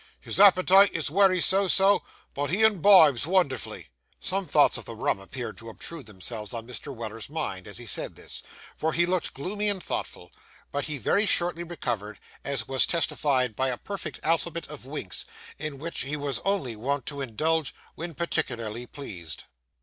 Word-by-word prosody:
His - - -3
appetite 195 0 +7
is 160 -3 -2
wery 190 +1 +4
so 195 +2 +4
so, 195 +2 +5 0.3
but 145 0 -2
he 195 +7 +2
imbibes 180 - +6
wonderful.' 175 -9 0 0.4
Some 195 -1 -1
thoughts 150 - +4
of - - -6
the 115 - -7
rum 110 - 0
appeared 105 0 -7
to 115 - -9
obtrude 140 +3 -7
themselves 105 +2 -5
on 115 -1 -5
Mr. 125 +3 -8
Weller's 115 -2 -6
mind, 145 - -4
as 100 - -6
he 120 - -7
said 110 - +1
this; - - -4 0.3
for 160 0 -1
he 175 - +3
looked 180 -2 -1
gloomy 205 +9 +1
and 195 -3 -2
thoughtful; - - -5 0.4
but 145 -1 -2
he 150 -2 -3
very 205 - +2
shortly 175 -2 +1
recovered, 115 - -4 0.3
as 135 -6 -2
was 135 -1 +3
testified 135 -7 +1
by 130 +3 +1
a 125 - -2
perfect 190 -6 -6
alphabet 165 0 0
of 150 -4 -9
winks, 135 - -3 0.3
in 150 -1 -4
which 165 +4 -2
he 145 +3 -2
was 140 -5 -2
only 195 - 0
wont 135 +4 -2
to 140 -1 -5
indulge 155 +5 0 0.2
when 170 -1 -7
particularly 120 -8 -3
pleased. 90 - -7
145 Hz, 175 wpm, -27 LUFS, 120-175 Hz, 0.4 s, appetite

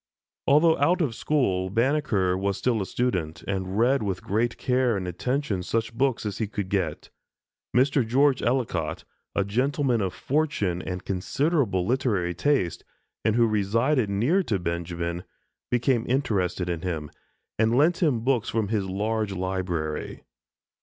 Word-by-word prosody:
Although 160 +3 +5
out 175 +6 +3
of 145 -9 0
school, 95 -10 0
Banneker 115 -5 +1
was 100 +1 -1
still 120 -4 0
a 95 - -3
student, 90 -9 -2
and 95 0 -2
read 125 +4 +3
with 95 -3 -3
great 115 +4 0
care 125 -3 +1
and 90 -2 -4
attention 105 - -1
such 115 +5 -2
books 130 -1 0
as 100 -2 -3
he 110 - 0
could 100 -2 -4
get. 90 -6 -2 0.7
Mr. 135 +1 +4
George 135 +4 +3
Ellicott, 115 -11 -1 0.3
a 100 - +1
gentlemen 125 +2 +1
of 95 -2 -1
fortune 135 - 0
and 90 0 -5
considerable 100 - 0
literary 105 -7 0
taste, 110 - 0 0.4
and 110 -1 +2
who 120 -1 +5
resided 115 +4 +1
near 120 - +2
to 115 - -1
Benjamin, 85 0 -3 0.5
became 120 -1 +1
interested 100 -9 0
in 85 -2 -2
him, 80 -5 -4 0.5
and 115 +2 +3
lent 165 +6 +3
him 140 -9 +2
books 125 -2 +1
from 110 -3 -1
his 105 -3 0
large 105 +1 -1
library. 90 -4 -3
110 Hz, 145 wpm, -26 LUFS, 95-130 Hz, 0.7 s, Although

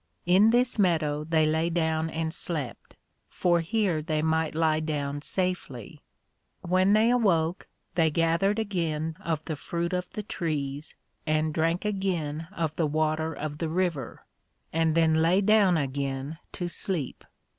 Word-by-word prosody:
In 190 +5 +5
this 245 0 +2
Meadow 155 -6 +2
they 160 0 +2
lay 160 +2 +1
down 160 -1 0
and 160 0 -3
slept, 150 -10 -5 0.3
for 175 -1 +2
here 180 -2 0
they 155 -1 -1
might 160 -1 0
lie 160 -1 +2
down 145 -2 -3
safely. 180 - -3 0.6
When 185 +3 +3
they 220 +2 +4
awoke, 180 -8 +1 0.3
they 165 -2 +3
gathered 165 +6 +1
again 165 -7 -2
of 165 -6 -3
the 155 - -3
Fruit 170 +4 -3
of 180 0 -2
the 210 - -4
Trees, 150 -6 -3 0.3
and 155 0 +1
drank 165 +4 0
again 170 -6 -2
of 165 -6 -2
the 160 - +2
water 155 +1 0
of 150 -1 -5
the 165 - -1
River, 165 -7 -2 0.5
and 160 -1 +2
then 165 -1 +4
lay 165 +4 +3
down 200 -3 +4
again 140 +1 -3
to 175 - -3
sleep. 175 -4 -3
160 Hz, 145 wpm, -27 LUFS, 155-180 Hz, 0.6 s, In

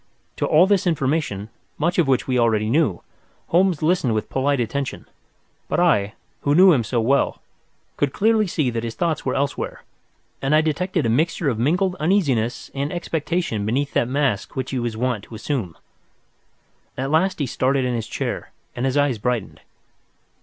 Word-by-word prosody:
To - - 0
all 160 +4 +6
this 195 -2 +2
information, 135 - -1 0.3
much 170 +4 0
of 165 - +3
which 130 -2 +1
we 130 -1 +1
already 110 -2 +2
knew, 135 - +1 0.5
Holmes 180 -2 +2
listened 155 -9 +2
with 110 - -3
polite 140 +1 +1
attention, 130 +3 -3 0.6
but - - 0
I, 105 - +2 0.3
who 145 +1 +2
knew 185 +1 +7
him 125 -6 +2
so 120 +2 -1
well, 135 +5 +1 0.6
could 145 -2 +1
clearly 215 - +2
see 150 -7 0
that 115 -1 -3
his 115 -1 -4
thoughts 165 -5 -1
were 130 - 0
elsewhere, 140 0 -2 0.6
and 135 +3 +2
I 155 - +5
detected 165 0 -1
a - - +1
mixture 155 +5 +1
of 115 -4 -2
mingled 180 +9 +1
uneasiness 140 - 0
and 140 +2 -2
expectation 165 - -2
beneath 135 +7 -1
that 120 - +2
mask 135 -6 -1
which 130 - -3
he 130 - -1
was 120 -2 -3
wont 120 -3 -1
to 115 - -11
assume. 110 - -3 1.2
At 135 +2 -2
last 185 +4 +2
he 145 - -1
started 130 +1 0
in 125 - -1
his 115 -2 -3
chair, - - -4 0.3
and 125 +2 -1
his 135 +2 0
eyes 140 -6 +2
brightened. 120 -1 -2
140 Hz, 175 wpm, -22 LUFS, 120-160 Hz, 1.2 s, knew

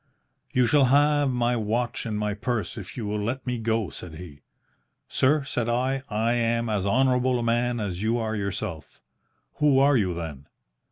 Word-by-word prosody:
"'You 125 -1 +3
shall 140 +3 +4
have 145 +2 +3
my 120 -1 +1
watch 115 +2 -2
and 110 -2 -2
my 105 0 -1
purse 105 -2 -3
if 105 0 -9
you 115 - -3
will 105 +1 -2
let 120 +6 -3
me 125 -2 -2
go,' 110 -6 -1
said 80 +3 -9
he. 80 -4 -11 0.7
"'Sir,' 145 +2 +2
said 120 -4 -2
I, 130 +3 0
'I 115 +2 +1
am 115 -1 0
as 100 -2 0
honourable 125 +2 +2
a 120 - -2
man 120 +1 +1
as 95 -4 -3
you 115 +2 +1
are 110 -1 -2
yourself.' 95 -6 -5 0.6
"'Who 145 -3 +4
are 140 +1 +5
you, 95 -7 +1
then?' 75 -5 -7
115 Hz, 180 wpm, -25 LUFS, 105-125 Hz, 0.7 s, are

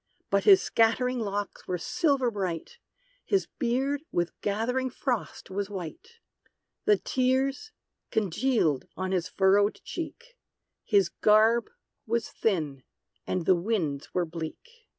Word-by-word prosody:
But - - +2
his 395 -3 +8
scattering 245 +3 +2
locks 205 -2 -4
were 180 - -1
silver 255 - +1
bright, 195 - -4 0.4
His 395 -2 +1
beard 270 +2 0
with 175 0 0
gathering 240 +6 0
frost 245 -6 -3
was 200 +1 -2
white; 195 - -7 0.7
The 420 -1 +5
tears 265 +10 0 0.4
congealed 210 - +1
on 185 0 -2
his 180 -2 0
furrowed 200 +2 +3
cheek, 470 +10 -7 0.5
His 200 -5 +3
garb 220 +2 +4 0.4
was 230 0 0
thin, 155 -10 -1 0.5
and 180 -3 -1
the 190 - +6
winds 170 -7 -2
were 180 -1 0
bleak. 165 - -7
220 Hz, 120 wpm, -28 LUFS, 185-260 Hz, 0.7 s, his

